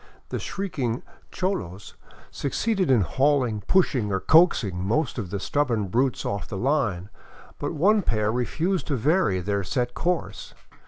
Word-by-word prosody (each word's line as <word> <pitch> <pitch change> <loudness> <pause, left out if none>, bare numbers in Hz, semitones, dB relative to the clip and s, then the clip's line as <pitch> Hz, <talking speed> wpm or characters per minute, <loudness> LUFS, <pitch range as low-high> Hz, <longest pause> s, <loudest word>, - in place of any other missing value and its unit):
The - - -3
shrieking 135 - -3 0.3
cholos 145 - -3 0.4
suc 140 - -4
ceeded 200 -7 0
in 125 -5 +5
hauling, 130 - +1
pushing, 130 - +2
or 95 - 0
coaxing 110 - +3
most 120 +7 0
of 100 -6 -4
the 100 +1 -3
stubborn 115 -4 0
brutes 125 +5 0
off 100 -7 -3
the - - -5
line, 110 -7 0 0.5
but - - -3
one 200 +7 +3
pair 110 - 0
refused 160 +10 -1
to 145 - 0
vary 130 - +2
their 100 +2 -1
set 125 +6 -2
course. 165 - -3
125 Hz, 150 wpm, -25 LUFS, 100-160 Hz, 0.5 s, in